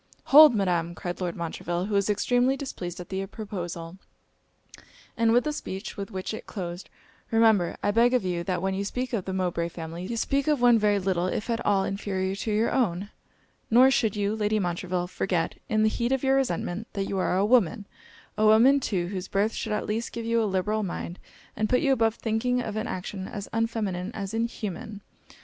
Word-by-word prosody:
'Hold! 295 -2 +8
Madam,' 175 -4 0
cried 175 +2 -5
Lord 175 -2 -2
Montreville, 170 +1 -3
who 210 - -4
was 200 0 +2
extremely 245 +6 +2
displeased 180 - -6
at 175 - -8
the 190 0 -2
proposal, 175 -4 -6 1.2
and 230 -1 +3
with 240 +1 +4
the 300 - -2
speech 195 -7 -6
with 200 -2 -5
which 190 +2 -4
it 220 - -7
closed 175 -2 -6 0.4
'Remember, 220 -6 +3
I 205 - +2
beg 235 +4 +4
of 245 - +1
you, 175 -2 -1
that 185 -2 -2
when 190 0 0
you 195 +1 -2
speak 250 +5 -3
of 205 -6 -1
the 190 - -3
Mowbray 175 -2 -1
family, 170 +2 -7
you 235 - -3
speak 275 +5 0
of 300 -3 +2
one 240 -2 +5
very 210 -1 +3
little 185 -2 0
if 210 +5 -2
at 230 - -1
all 200 -2 +2
inferior 190 -1 -2
to 215 - -3
your 215 +2 +1
own; 205 -5 0 0.6
nor 255 +4 +6
should 220 -5 +1
you, 205 +1 0
Lady 215 0 0
Montreville, 180 -1 -1
forget, 180 -1 -2
in 215 0 +2
the - - +5
heat 235 +3 -1
of 270 0 0
your 270 0 +3
resentment, 220 -4 -2
that 195 -1 -2
you 195 - -2
are 185 - +1
a 195 - +3
woman 220 -2 +3 0.5
a 215 - +4
woman 240 +6 +6
too, 190 -9 -1
whose 190 -1 -4
birth 205 +3 0
should 220 - -4
at 210 - -1
least 225 +2 -2
give 230 -1 -5
you 230 0 +2
a - - +1
liberal 210 +3 0
mind, 175 -2 -5 0.4
and 215 0 -1
put 250 - +3
you 275 - +2
above 225 -3 +2
thinking 235 +3 0
of 220 -4 -4
an 215 +2 -2
action 190 +1 -5
as 200 -1 -6
unfeminine 215 -5 -1
as 200 0 -5
inhuman. 215 -3 -4
205 Hz, 210 wpm, -26 LUFS, 185-230 Hz, 1.2 s, Hold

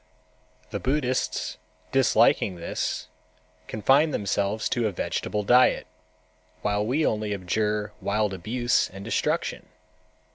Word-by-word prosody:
The - - -3
Buddhists, 130 - -1 0.3
disliking 130 -7 +3
this, 85 -1 -3 0.6
confine 135 +8 +3
themselves 100 -2 -1
to 120 -3 +1
a - - -1
vegetable 105 +3 -2
diet, 125 +5 +4 0.8
while 105 0 +1
we 135 +8 +1
only 105 -1 0
abjure 105 +2 -1
wild 105 0 0
abuse 120 +7 0
and 95 +1 -10
destruction. - - -1
105 Hz, 105 wpm, -26 LUFS, 100-125 Hz, 0.8 s, diet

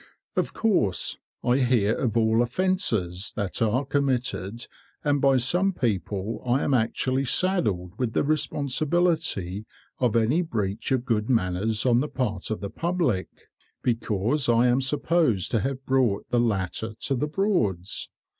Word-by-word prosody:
Of - - -1
course, 145 - +1 0.2
I 125 +2 +2
hear 120 -5 +2
of 120 -3 -1
all 110 0 +3
offences 120 - 0
that 100 0 -3
are 115 +5 +1
committed, 125 -6 -1 0.4
and 145 -2 +1
by 135 -1 +4
some 180 +10 +2
people 105 - -2
I 125 +3 +1
am 140 - +1
actually 130 +3 +1
saddled 110 - 0
with 120 -3 -1
the - - +2
responsibility 145 - 0 0.3
of 120 -4 +1
any 115 +9 +3
breach 110 - -3
of 130 -2 +1
good 110 -2 0
manners 110 0 +1
on 120 -2 +4
the 150 +3 -1
part 105 -8 -2
of 110 - -3
the 100 - -5
public, 165 - -1 0.5
because 120 +3 0
I 120 +1 +4
am 125 +2 +3
supposed 145 - +1
to 115 - +2
have 135 +2 -3
brought 125 -7 +1
the 120 - +3
latter 110 0 -1
to 140 - -1
the 145 +4 -1
Broads. 130 - -1
120 Hz, 145 wpm, -25 LUFS, 105-140 Hz, 0.5 s, by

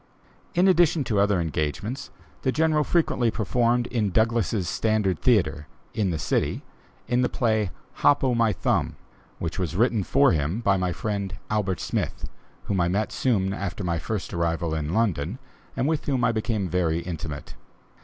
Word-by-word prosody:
In 180 +2 +4
addition 175 -4 +4
to 110 -5 0
other 100 -2 +3
engagements, 80 - -3 0.3
the 130 - +1
General 155 +1 +2
frequently 145 -8 +1
performed 120 +2 +1
in 115 -4 0
Douglass's 110 -2 +1
Standard 105 -2 +1
Theatre, 95 - +2 0.3
in 105 -4 0
the 85 - -1
city, 75 - -1 0.4
in 125 0 +2
the 125 - +2
play 110 -5 +1 0.3
"Hop 145 -1 +4
o' 130 -2 +2
my 115 -2 +3
Thumb," 90 - 0 0.4
which 85 +2 -4
was 90 -2 -2
written 115 0 +2
for 140 +6 +4
him 80 +6 0
by 100 -4 +2
my 90 -1 0
friend, 100 -1 -3
Albert 100 -4 0
Smith, - - -3 0.4
whom 95 -3 0
I 85 - +2
met 100 +4 0
soon 100 -7 +1
after 100 0 -4
my 85 -2 -1
first 105 +3 -4
arrival 85 -1 -1
in 75 -1 -2
London 95 - 0 0.4
and 130 - +1
with 155 -1 0
whom 130 -4 0
I 120 - +4
became 110 -3 -1
very 85 -1 0
intimate. 80 -4 -6
105 Hz, 165 wpm, -25 LUFS, 90-120 Hz, 0.4 s, In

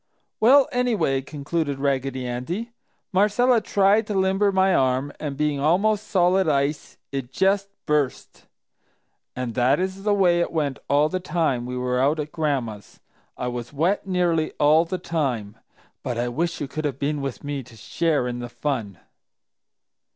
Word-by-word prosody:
"Well, 265 +5 +6
anyway," 210 - +1
concluded 145 +1 -3
Raggedy 135 -2 -1
Andy, 165 - -4 0.4
"Marcella 220 +5 +3
tried 205 +2 +3
to 210 - -3
limber 190 +1 +2
my 190 0 +3
arm 130 +1 +1
and, 145 -3 -4
being 150 -1 0
almost 200 +8 +2
solid 185 -1 +3
ice, 140 +1 -1
it 135 -3 -4
just 195 +5 +1 0.2
burst. 150 -3 -2 0.9
And 125 -2 -3
that 130 +5 +2
is 190 +1 -3
the 205 0 +2
way 175 -3 +3
it 170 - 0
went 145 -5 -1
all 145 +2 +4
the 185 +4 -2
time 155 -9 -1
we 125 0 -4
were 125 0 -1
out 145 +4 +2
at 150 0 -4
Gran'ma's; 130 - -3 0.4
I 125 - -3
was 120 0 -6
wet 175 +8 0
nearly 175 -4 +1
all 155 +3 +5
the 185 +2 -3
time. 130 - -2 0.4
But 120 - -3
I 120 +1 -1
wish 165 +7 -2
you 145 - -3
could 155 +2 -3
all 140 - -3
have - - -24
been 145 +1 -1
with 135 -3 -5
me 145 -1 -3
to 120 -2 -15
share 150 +2 0
in 120 0 -4
the 120 0 -6
fun." 120 -8 -3
150 Hz, 165 wpm, -23 LUFS, 130-185 Hz, 0.9 s, Well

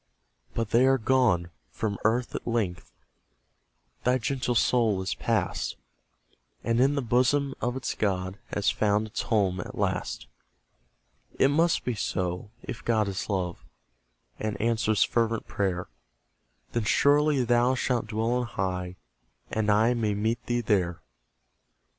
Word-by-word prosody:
But 115 -2 -2
they 125 +3 +5
are 135 0 +4
gone; 110 -9 +2 0.2
from 105 -3 -3
earth 120 +3 +1
at - - -5
length 110 -7 -2 1.1
Thy 125 +1 +3
gentle 130 -1 -1
soul 115 -4 +3
is 95 - -1
pass'd, 105 - -1 0.9
And 115 0 +1
in 135 +3 +4
the 140 - -1
bosom 130 +4 +2
of 125 +1 -1
its 130 - -2
God 95 -1 -2
Has 105 0 +1
found 105 0 +1
its 110 - -4
home 95 -5 +1
at - - -7
last. - - -2 1.1
It 135 - +4
must 165 +4 +2
be 125 - 0
so, 90 -2 -2
if 125 - -7
God 110 -3 +2
is 95 +2 -4
love, 90 -3 -2 0.8
And 110 -1 -3
answers 110 -2 +2
fervent 115 -1 0
prayer; 95 -3 -2 0.8
Then 115 -2 -1
surely 145 +2 +4
thou 120 +2 +3
shalt 125 -3 0
dwell 110 +2 -1
on 125 0 0
high, 90 -4 -3 0.6
And 110 -1 0
I 110 +4 +4
may 110 -4 0
meet 110 +3 -1
thee 120 0 +1
there. 90 -6 +1
115 Hz, 140 wpm, -27 LUFS, 100-125 Hz, 1.1 s, they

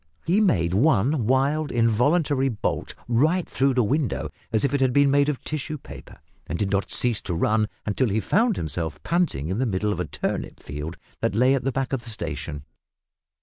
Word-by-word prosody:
He 185 +6 +3
made 85 - +2
one 125 +2 +2
wild 140 +4 +1
involuntary 135 +5 +2
bolt 105 -5 -3
right 155 +10 +2
through 135 -1 +1
the 125 - +3
window, 135 +4 -1 0.2
as 110 +3 +2
if 140 - 0
it 140 - +1
had 130 -2 +3
been 140 0 +4
made 140 +1 +3
of 145 - -3
tissue 155 0 -4
paper, - - -12 0.3
and 85 - -3
did 100 0 -1
not 100 -1 0
cease 120 -4 +1
to 85 - -3
run 105 +5 +1 0.2
until 110 +4 +1
he 105 +2 +1
found 225 - +2
himself 80 -1 -4
panting 165 - 0
in 95 +4 -1
the 130 - +1
middle 105 +1 0
of - - -6
a - - -1
turnip - - -4
field 75 +4 -6 0.2
that 95 - -1
lay 125 +4 +4
at 130 -2 -1
the 135 - +1
back 135 +1 -2
of 125 -3 -1
the 115 - -9
station. 75 -9 -5
125 Hz, 200 wpm, -24 LUFS, 105-145 Hz, 0.3 s, been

